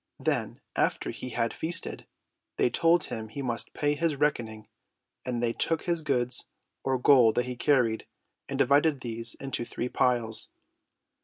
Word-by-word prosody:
Then, - - -1 0.2
after - - 0
he 130 - -7
had 115 -1 -1
feasted, 170 +2 -2 0.5
they 125 - +2
told 165 -1 +3
him 110 0 -5
he 140 +5 -5
must 120 -3 -1
pay 145 0 +1
his 160 0 0
reckoning, 120 -7 -1 0.6
and 120 -1 -2
they 115 -1 +1
took 165 +5 0
his 170 -2 0
goods 125 -4 0 0.4
or 130 -1 +1
gold 125 -3 +6
that 125 - +1
he 125 0 -4
carried 125 -4 +2 0.4
and - - -3
divided 145 +1 +3
these 115 -1 -1
into 135 -3 -3
three 120 +1 -4
piles. 120 -4 +1
125 Hz, 155 wpm, -28 LUFS, 115-145 Hz, 0.6 s, gold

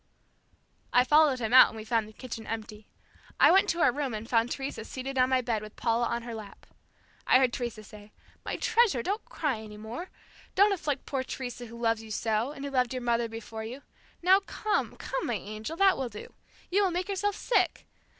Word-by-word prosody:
I 250 - +5
followed 300 0 +5
him 230 -1 -2
out 255 - +10
and 225 - -9
we 215 - -6
found 225 -1 0
the - - -12
kitchen 230 -1 -8
empty. 215 -1 -6 0.5
I - - +7
went 385 +2 +5
to 335 - 0
our 250 - +5
room 270 -3 -3
and 215 +1 -6
found 230 0 +2
Teresa 270 -3 -4
seated 265 +4 -6
on 255 0 +4
my 260 -1 +3
bed 230 -3 -1
with 215 0 -10
Paula 235 0 +1
on 235 +1 -2
her 235 -1 -6
lap. 215 -3 -10 0.6
I - - +7
heard 255 -2 +2
Teresa 235 -4 -4
say, 210 0 -14 0.3
"My - - -3
treasure, 450 - +2
don't 405 +4 -2
cry 280 -8 -2
any 215 -1 -10
more! 230 - -7 0.5
Don't 400 +1 +5
afflict 295 -7 -3
poor 270 -2 -2
Teresa 245 -2 -6
who 235 +1 -11
loves 225 -1 +1
you 220 - -11
so, 220 +3 -1
and 280 -2 -7
who 280 - -4
loved 255 -2 +1
your 250 - -4
mother 235 -1 +1
before 225 0 -7
you. 250 +5 -8 0.4
Now, 375 +2 +6
come, 420 +2 -2
come, - - -4
my - - 0
angel, 215 +9 -6
that 390 -3 +4
will 260 -2 -2
do. 210 -1 -10 0.4
You 405 +3 +3
will 385 - +3
make 360 +1 -2
yourself 405 +1 -1
sick. 485 - 0
245 Hz, 215 wpm, -29 LUFS, 225-295 Hz, 0.6 s, out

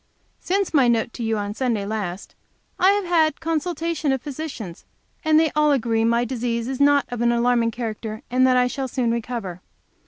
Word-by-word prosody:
Since 390 0 -1
my 270 -5 +5
note 235 -1 +1
to - - -7
you 225 -1 0
on 205 0 -3
Sunday 225 -4 -1
last, 200 -3 -4 0.5
I 375 - +5
have 405 -1 -1
had 325 -3 +3
a - - -29
consultation 330 -1 -1
of 265 -2 -1
physicians, 275 - -7 0.4
and 315 0 +4
they 320 -1 +2
all 300 0 +3
agree 230 -4 +1
that - - +3
my 235 +1 +2
disease 235 -1 -2
is 265 +1 -3
not 285 0 +4
of 245 -1 -4
an 235 0 +3
alarming 235 -1 +2
character, 220 -2 -5
and 255 +1 +4
that 255 -1 +4
I 250 - +4
shall 265 +2 -3
soon 245 -2 -1
recover. 230 -6 -4
245 Hz, 200 wpm, -22 LUFS, 230-295 Hz, 0.5 s, my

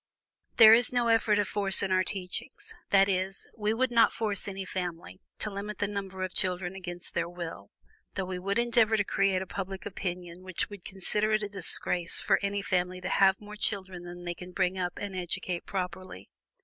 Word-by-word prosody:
"There 220 -2 +10
is 230 0 +4
no 240 -2 +1
element 225 -2 +4
of 205 - +1
force 195 -1 +3
in 195 - -1
our 185 0 +4
teachings; 180 -1 -5 0.2
that 195 0 +5
is, 190 0 -2
we 210 -1 0
would 250 +3 +1
not 230 -1 +5
force 210 -4 -1
any 195 -1 -5
family 180 0 -5 0.2
to 215 - -1
limit 200 +1 -5
the 205 - 0
number 195 -2 -4
of 185 - -4
children 180 0 -1
against 175 -2 -4
their 170 0 -1
will, 170 - -7 0.5
though 190 - -1
we 180 0 -4
would 195 +3 -1
endeavor 235 -2 +3
to 205 - +2
create 195 -1 +1
a - - -9
public 195 0 -5
opinion 180 -2 -5
which 185 +1 -2
would 200 -3 -10
consider 210 +3 -1
it 215 0 +2
a 205 - -3
disgrace 180 -3 +2
for - - +3
any 200 0 -1
family 180 -1 0
to 185 +1 -4
have 190 0 +4
more 210 0 -10
children 190 -4 -2
than 175 0 -9
they 175 - -2
can 180 +1 -11
bring 180 +1 +1
up 180 -1 -2
and 200 -2 -5
educate 180 0 -3
properly. 180 - -5
190 Hz, 200 wpm, -29 LUFS, 180-205 Hz, 0.5 s, There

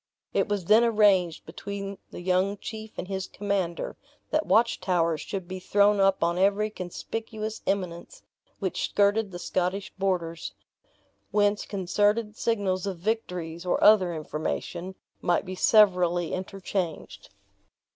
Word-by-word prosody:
It - - +1
was 205 -4 -1
then 215 +5 +6
arranged 205 -7 +3
between 200 -1 -6
the - - -8
young 185 +3 +1
chief 220 +1 -8
and - - -4
his 190 -1 -3
commander 195 -4 -2 0.3
that 310 +1 +1
watchtowers 180 -8 +2
should 190 -3 -5
be 185 +1 -5
thrown 205 +2 +3
up 195 -2 +3
on 170 +1 +1
every 205 +2 +2
conspicuous 220 +4 -5
eminence 190 - -3 0.3
which - - -2
skirted 205 +1 +2
the 180 - -7
Scottish 185 +3 -2
borders; 175 -4 -2 0.7
whence 205 0 +1
concerted 205 +3 +1
signals 200 -5 0
of 190 -3 -3
victories, 180 -4 -3
or 180 - +1
other 190 -5 +6
information, 170 +4 -4 0.3
might 175 +2 +1
be 185 - -5
severally 180 -4 +4
interchanged. 185 -3 -4
195 Hz, 125 wpm, -27 LUFS, 180-210 Hz, 0.7 s, then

